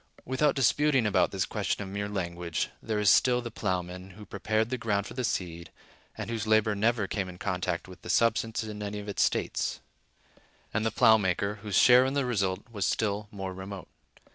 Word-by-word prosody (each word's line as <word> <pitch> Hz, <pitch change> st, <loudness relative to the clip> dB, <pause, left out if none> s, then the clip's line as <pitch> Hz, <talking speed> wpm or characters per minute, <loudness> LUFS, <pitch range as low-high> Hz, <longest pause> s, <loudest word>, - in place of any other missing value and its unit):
Without 130 Hz, +4 st, +1 dB
disputing 135 Hz, 0 st, +3 dB
about 100 Hz, -3 st, +3 dB
this 95 Hz, -2 st, -1 dB
question 105 Hz, -1 st, -2 dB
of -, -, -7 dB
mere 100 Hz, +1 st, -3 dB
language, 85 Hz, -4 st, -3 dB
there 110 Hz, -1 st, -2 dB
is 105 Hz, 0 st, 0 dB
still 125 Hz, +5 st, +5 dB
the 120 Hz, -1 st, -6 dB
plowman, 90 Hz, -2 st, -3 dB
who 105 Hz, -, -10 dB
prepared 110 Hz, +4 st, -1 dB
the 130 Hz, -, 0 dB
ground 105 Hz, -3 st, 0 dB
for -, -, -8 dB
the 130 Hz, -, -3 dB
seed, 85 Hz, -6 st, -3 dB, 0.5 s
and -, -, -4 dB
whose 115 Hz, -1 st, -3 dB
labor 110 Hz, -1 st, +3 dB
never 110 Hz, +1 st, +1 dB
came 95 Hz, -1 st, -3 dB
in 90 Hz, -, -10 dB
contact 90 Hz, -2 st, -2 dB
with 90 Hz, -1 st, -13 dB
the -, -, -9 dB
substance 115 Hz, +2 st, +2 dB
in 105 Hz, -1 st, -7 dB
any 105 Hz, 0 st, -4 dB
of 105 Hz, 0 st, -7 dB
its 100 Hz, -, -1 dB
states; -, -, 0 dB, 0.9 s
and 105 Hz, -, 0 dB
the -, -, +2 dB
plow 110 Hz, 0 st, +5 dB
maker, 100 Hz, +1 st, -1 dB
whose 105 Hz, -3 st, -3 dB
share 125 Hz, 0 st, +7 dB
in 135 Hz, +1 st, -1 dB
the 140 Hz, -2 st, +1 dB
result 100 Hz, -6 st, 0 dB
was 100 Hz, -4 st, -3 dB
still 105 Hz, -1 st, -1 dB
more 95 Hz, -2 st, -5 dB
remote. 95 Hz, -1 st, -8 dB
105 Hz, 200 wpm, -28 LUFS, 95-115 Hz, 0.9 s, share